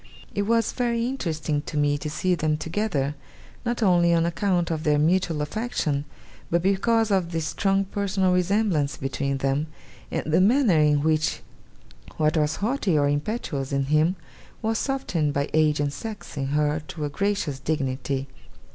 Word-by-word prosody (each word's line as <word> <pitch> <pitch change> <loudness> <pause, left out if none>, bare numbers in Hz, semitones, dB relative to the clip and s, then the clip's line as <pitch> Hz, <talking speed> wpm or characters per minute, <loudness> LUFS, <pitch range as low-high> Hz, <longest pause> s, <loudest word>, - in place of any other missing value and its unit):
It 200 0 -1
was 230 -1 +2
very 235 -2 0
interesting 160 - -2
to 150 - -4
me 145 0 +2
to 150 - -4
see 180 +4 0
them 155 -2 0
together, 155 -4 -1 0.5
not 240 -1 -1
only 175 -3 +4
on 165 0 +2
account 175 0 0
of 155 -1 -2
their 150 -2 +3
mutual 165 0 +2
affection, 150 -5 -2 0.4
but 170 0 +1
because 220 +3 +2
of 185 -3 +1
the 165 - -1
strong 195 +5 0
personal 195 -2 0
resemblance 180 -5 +1
between 135 0 -2
them, 135 +3 0 0.4
and - - -2
the 160 +3 +3
manner 215 - +4
in 150 -1 +3
which 155 -1 +1 0.8
what 155 +1 +2
was 150 -1 +1
haughty 210 - 0
or 145 -1 +3
impetuous 145 - -2
in 140 0 +1
him 160 +4 +3 0.5
was 225 0 0
softened 180 - -1
by 140 +1 -1
age 155 -1 +3
and 145 -1 0
sex, 215 +7 -7
in 135 -2 -2
her, 150 +2 +1
to 155 -3 -4
a - - -2
gracious 185 -5 -1
dignity. 135 -2 -2
160 Hz, 165 wpm, -25 LUFS, 150-200 Hz, 0.8 s, only